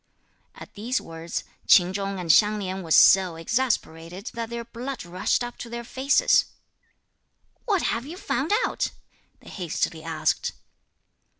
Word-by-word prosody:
At - - -12
these 235 +5 -1
words, 165 0 -6 0.2
Ch'in 180 0 +6
Chung 195 -1 -3
and 170 -2 +2
Hsiang 210 +3 +5
Lin 190 -1 -4
were 165 - -9
so 180 +1 +6
exasperated 180 -2 -2
that 230 -1 -4
their 235 0 -5
blood 245 0 -6
rushed 180 +7 0
up 240 0 -7
to 235 - -7
their 235 0 -5
faces. 265 +3 +3 1.2
"What 400 -6 +1
have 235 +4 -1
you 340 +4 -8
found 285 -3 -2
out?" - - -1 0.5
they - - -13
hastily 170 -3 -3
asked. 160 -1 -1
205 Hz, 140 wpm, -25 LUFS, 175-240 Hz, 1.2 s, Ch'in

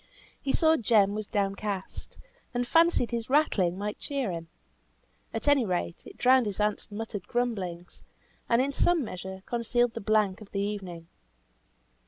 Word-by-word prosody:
He 275 - -1
saw 320 +2 +4
Jem 205 -3 +3
was 210 -1 -4
downcast, 200 -1 -3 0.4
and 245 0 +1
fancied 330 -3 +3
his 235 0 -3
rattling 200 - +2
might 210 +1 -4
cheer 275 -8 -2
him; 165 -1 -5 0.8
at 225 - -4
any 285 -3 +5
rate, 180 -4 -2
it - - -12
drowned 255 -2 +5
his 200 -1 -4
aunt's 210 0 0
muttered 205 -2 -6
grumblings, 195 -8 -3 0.5
and 235 +2 +4
in 280 - -1
some 345 +1 +3
measure 190 -2 -7
concealed 240 0 +1
the 230 - -5
blank 210 -1 +1
of 205 - -11
the 200 - -3
evening. 190 -5 -4
215 Hz, 155 wpm, -28 LUFS, 195-245 Hz, 0.8 s, any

